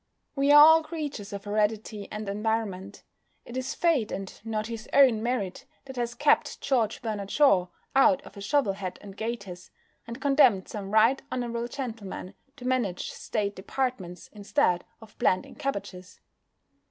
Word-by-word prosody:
We 280 0 +3
are 295 - +9
all 320 +2 +9
creatures 300 -10 -6
of 200 -1 -6
heredity 210 0 -1
and 215 0 -5
environment. 205 -2 -3 0.4
It 240 - -10
is 260 +3 -3
Fate, 320 -11 +1
and 195 -1 -5
not 215 -1 -2
his 225 -1 -7
own 260 -6 +6
merit, 245 +1 -3 0.2
that 265 -1 -9
has 240 -1 -3
kept 295 +4 +2
George 240 -3 0
Bernard 210 -3 -3
Shaw 200 -12 +4 0.3
out 275 +1 +5
of - - -13
a 200 - -9
shovel 215 -1 +1
hat 185 -2 -6
and 200 -1 -11
gaiters, 200 -6 -6 0.4
and 235 +2 -7
condemned 270 -8 +4
some 200 -2 -6
Right 220 +5 +4
Honourable 235 -1 -2
Gentlemen 225 -7 -6 0.2
to 250 -3 -11
manage 245 -8 -1
State 200 -1 -3
Departments 195 -4 -4
instead 205 -3 +1 0.2
of 220 -1 -15
planting 185 - +1
cabbages. 185 -8 -5
220 Hz, 155 wpm, -27 LUFS, 200-260 Hz, 0.4 s, are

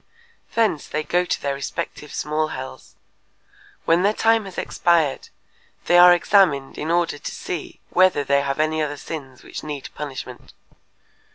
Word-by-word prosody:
] 465 - -34
Thence 220 -10 +1
they 155 +1 -2
go 180 +3 +1
to - - -1
their 140 -1 0
respective 150 +2 -5
small 155 +1 -1
hells. 130 -3 -8 0.9
When 165 +2 +4
their 205 +3 +2
time 225 -1 +3
has 190 - -10
expired, 165 -5 +1 0.6
they 175 - +5
are 180 0 +9
examined 175 -6 +3
in 155 - -3
order 170 -3 +1
to - - -6
see - - -6
whether 185 -5 +4
they 140 0 +2
have 140 +1 -2
any 155 0 +1
other 145 -1 -2
sins 135 -5 -8
which - - -7
need 145 -3 -6
punishment. 135 -4 -8
155 Hz, 160 wpm, -22 LUFS, 140-175 Hz, 0.9 s, are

